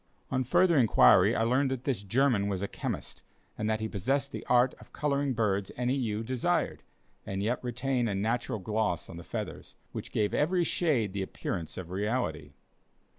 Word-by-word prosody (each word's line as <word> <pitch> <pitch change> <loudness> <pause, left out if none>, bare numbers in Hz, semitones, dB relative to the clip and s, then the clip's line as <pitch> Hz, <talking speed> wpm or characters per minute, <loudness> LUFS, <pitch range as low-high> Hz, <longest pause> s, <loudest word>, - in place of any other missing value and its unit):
On 130 0 +1
further 170 +7 +4
inquiry 100 - +6
I 115 - +2
learned 130 +4 +2
that 130 -2 -3
this 130 -8 -1
German 110 0 +2
was 100 -1 -2
a - - -1
chemist, - - -5 0.3
and 110 0 -2
that 110 0 +1
he 110 - -1
possessed 135 +8 -1
the - - -6
art 125 +1 +4
of - - -16
coloring 140 -3 0
birds 100 -3 0
any 125 +2 +1
hue 110 -5 -1
desired, 130 +8 0 0.4
and 95 0 -3
yet 120 +5 -1
retain 125 0 0
a 100 - -1
natural 110 +3 -1
gloss 105 -3 -1
on 85 - -9
the 85 - -8
feathers, - - -6 0.2
which - - -6
gave 105 -1 0
every 175 +4 +2
shade 140 - +1
the 100 - -2
appearance 90 -3 -4
of 90 -2 -6
reality. 95 - -2
115 Hz, 180 wpm, -29 LUFS, 100-130 Hz, 0.4 s, inquiry